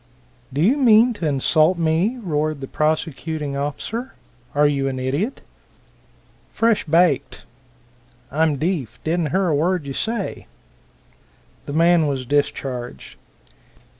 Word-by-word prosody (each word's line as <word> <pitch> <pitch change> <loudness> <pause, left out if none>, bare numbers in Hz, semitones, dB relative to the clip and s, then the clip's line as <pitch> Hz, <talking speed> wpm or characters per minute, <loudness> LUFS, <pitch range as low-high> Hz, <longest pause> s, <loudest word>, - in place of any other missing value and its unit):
"Do 140 +3 -2
you 230 - +4
mean 240 -2 +5
to 180 -7 -3
insult 155 +5 +2
me?" 170 +9 +1
roared 155 -3 -1
the 135 - -6
prosecuting 155 -1 -2
officer. 175 - -4 0.4
"Are 145 +1 +4
you 140 -2 +1
an 130 -1 -3
idiot?" 140 - -2 1.1
"Fresh 225 -1 +1
baked. 165 -5 +2 0.9
I'm 155 +1 +2
deefe. 140 - -2
I - - -1
don't 170 -3 0
hear 190 +6 +1
a 155 - +2
word 170 +1 0
you 140 - -5
say." 220 - -3 1.2
The 145 - -4
man 165 0 +4
was 135 -3 -2
discharged. 130 - -2
155 Hz, 125 wpm, -21 LUFS, 140-180 Hz, 1.2 s, mean